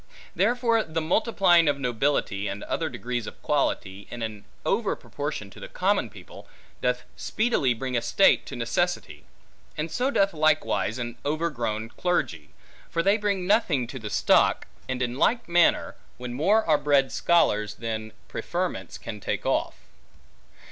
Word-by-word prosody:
Therefore 235 -2 +2
the 160 +1 -3
multiplying 175 -1 +3
of 145 -1 +2
nobility, 120 -5 0
and 100 +1 -5
other 160 -1 -2
degrees 120 -4 -4
of - - -9
quality, 95 +1 -1
in 120 -1 -6
an 105 -2 -6 0.2
over 210 +1 +1
proportion 145 -9 -5
to - - -13
the - - -8
common 190 - 0
people, 100 -4 -13 0.3
doth 125 0 0
speedily 215 - +1
bring 130 +2 -3
a 120 - +2
state - - +4
to - - -6
necessity; - - -2 0.5
and 155 +2 -3
so 255 +2 0
doth 195 -8 +2
likewise 155 -6 +1
an 120 -1 -5
overgrown 125 -8 -2
clergy; 100 - -1 0.4
for 165 - 0
they 200 +3 +4
bring 200 -4 -1
nothing 180 - +2
to 130 +3 -7
the 110 -2 -6
stock; - - +3 0.2
and 130 -1 -1
in 125 +2 -3
like 240 +1 +2
manner, 170 0 +3 0.2
when 125 0 -6
more 195 - +3
are 155 -2 +3
bred 140 -2 +3
scholars, 105 -11 +2
than 110 -1 -4 0.2
preferments - - -3
can - - -7
take - - -3
off. - - 0
145 Hz, 155 wpm, -26 LUFS, 115-180 Hz, 0.5 s, state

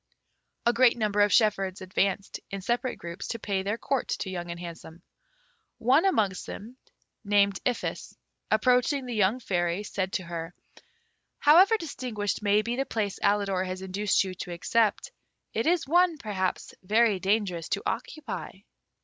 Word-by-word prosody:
A 235 - +4
great 240 0 +4
number 210 -2 +1
of 205 0 +4
shepherds 195 -4 +2
advanced, 190 +1 -1
in 195 0 -5
separate 240 +5 -1
groups, 170 +3 -7
to 230 - -3
pay 200 -3 -2
their 205 +3 -2
court 270 +2 -1
to 190 - -3
Young 175 -2 -5
and 170 0 -6
Handsome. 170 0 -9 0.7
One 270 - +3
amongst 210 - +1
them, 230 +5 -8 0.5
named 200 -1 +3
Iphis, 245 - -3 0.3
approaching 250 +4 +2
the 245 - -4
young 215 +3 +2
Fairy, 175 -3 -1
said 190 -2 -3
to 185 - -1
her, 170 0 -6 0.8
"However 365 +9 +6
distinguished 240 - -3
may 205 +1 +3
be 235 +2 -2
the 270 - +1
place 205 -3 -2
Alidor 200 -2 +1
has 185 0 -5
induced 195 +2 +1
you 190 -1 -5
to 180 - -6
accept, 210 +5 +1 0.4
it 225 - -1
is 345 0 +2
one, 345 +1 +3
perhaps, 190 -7 -3
very 215 +1 +3
dangerous 190 -4 0
to - - -1
occupy." 310 -1 -4
205 Hz, 155 wpm, -27 LUFS, 185-240 Hz, 0.8 s, However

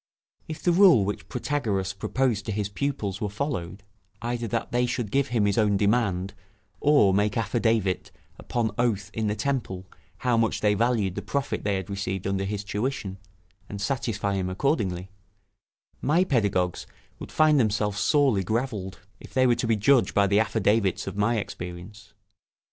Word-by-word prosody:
If 155 - -7
the 175 - +3
rule 170 - +6
which 105 - -5
Protagoras 110 -8 -1
proposed 115 +2 -1
to - - -1
his 105 -1 -2
pupils 105 -5 -3
were 105 - -1
followed 100 - -4 0.4
either 120 +1 -3
that 115 +1 -3
they 125 0 +1
should 120 -3 -3
give 140 0 +2
him 115 -5 +1
his 100 +2 +1
own 105 -2 +3
demand, 100 -3 +1 0.5
or 140 -10 +4
make 105 +2 +1
affidavit 110 -4 0 0.3
upon 115 -3 -1
oath 105 -5 0
in 110 -1 -1
the 105 - 0
temple 115 -9 -2 0.4
how 120 -2 +3
much 115 -1 +1
they 105 -1 +3
valued 110 -3 +1
the 100 - -4
profit 135 +8 -2
they 100 -1 0
had 95 -2 -4
received 100 -1 -4
under 95 0 -1
his 105 0 -3
tuition, 105 -2 -3 0.5
and 100 - -6
satisfy 105 -4 -1
him 95 -2 -1
accordingly 95 - -1 0.9
my 165 +6 +3
pedagogues 100 - 0 0.3
would - - -8
find 155 -2 +4
themselves 105 -3 0
sorely 135 -10 +3
gravelled, 105 -3 -3 0.2
if - - -14
they 130 -1 +4
were 125 - +5
to 120 - -2
be 115 - +3
judged 120 +5 +3
by 100 - +5
the 100 +1 +3
affidavits 105 -2 +1
of 95 - -5
my 110 +3 +1
experience. 100 +2 -7
105 Hz, 165 wpm, -26 LUFS, 100-120 Hz, 0.9 s, rule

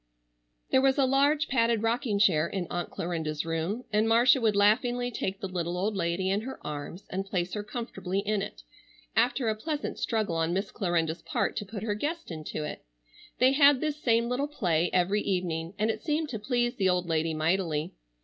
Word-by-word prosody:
There 260 - +5
was 270 0 +3
a 275 - +4
large 285 +4 +3
padded 230 -3 +2
rocking 225 -1 +1
chair 170 -7 +4
in 190 -1 -3
Aunt 175 -1 -2
Clarinda's 160 -3 -3
room 165 +9 -2
and 215 +2 +3
Marcia 245 +3 +5
would 220 -3 +2
laughingly 245 +4 +2
take 195 -3 -3
the 195 - -3
little 175 -1 -3
old 205 +3 -1
lady 185 +1 0
in 200 +2 +1
her 260 +4 -7
arms 150 +5 -6
and 190 +1 -1
place 180 -2 -2
her 210 - -2
comfortably 205 -4 -4
in 210 0 0
it, 195 - -7 0.5
after 250 0 +2
a 220 - +2
pleasant 290 +7 -4
struggle 215 -7 0
on 165 +1 0
Miss 195 +1 -2
Clarinda's 170 -4 -1
part - - -1
to 205 - -3
put 205 -1 -6
her 215 -2 0
guest 300 - -3
into 155 -1 -5
it. 150 - -6 0.5
They 255 +1 +5
had 280 -1 +6
this 305 0 -2
same 230 -1 +2
little 255 +4 -1
play 175 - 0
every 185 +3 +2
evening, 175 -2 -2
and 215 +2 +2
it - - -7
seemed 305 -1 -1
to 220 - -4
please 240 +2 0
the 190 -2 +2
old 180 0 +1
lady 160 -1 0
mightily. 160 -1 0
205 Hz, 195 wpm, -28 LUFS, 175-245 Hz, 0.5 s, had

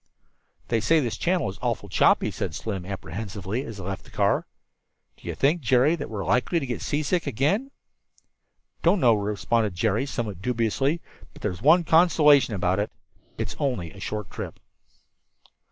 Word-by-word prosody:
"They 115 - +2
say 155 +9 +3
this 120 -6 -1
channel 175 - 0
is 95 - -6
awfully - - -2
choppy," - - +3
said - - -4
Slim 95 -5 -4
apprehensively, 100 +4 -4
as 115 -5 -8
they 95 - -7
left 95 +1 -5
the - - -17
car. - - +1 0.7
"Do - - -15
you - - -3
think, 155 +5 +2
Jerry, 130 +5 +3
that 145 -4 -6
we're 100 -4 -4
likely 125 - +2
to 140 - -4
get 125 -2 -4
seasick 155 +3 -1
again?" 190 - 0 1.1
"Don't 180 +4 +3
know," 120 -6 +5
responded 105 0 0
Jerry, 105 +4 +1
also 140 - -7
somewhat 105 -6 -4
dubiously, 125 - 0 0.3
"but - - -15
there's 90 -3 -3
one 165 +7 +6
consolation 150 - +5
about 95 0 +1
it 105 - -1 0.5
it's - - -4
only 120 - -1
a 100 - -13
short 105 0 -5
trip." - - -7
115 Hz, 170 wpm, -25 LUFS, 100-150 Hz, 1.1 s, one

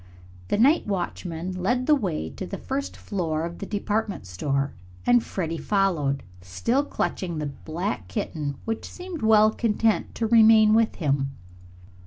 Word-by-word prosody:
The - - +1
night 275 +7 +4
watchman 180 -2 -3
led 245 +7 +1
the 305 - +5
way 180 - -1
to - - -6
the - - -5
first 275 +1 -4
floor 165 -5 -2
of 170 0 -7
the 200 - -5
department 210 - -2
store 135 +10 -1 0.3
and 245 -1 +5
Freddie 165 -3 -3
followed, 160 -8 +1 0.2
still 95 - 0
clutching 180 - -2
the 150 - -2
black 160 +7 -4
kitten, 150 -9 -3
which 225 0 -3
seemed 360 -3 -7
well 215 -1 +6
content 220 -1 0
to 230 - -1
remain 220 -1 +6
with 225 0 +3
him. 140 -3 -1
195 Hz, 150 wpm, -25 LUFS, 155-225 Hz, 0.3 s, well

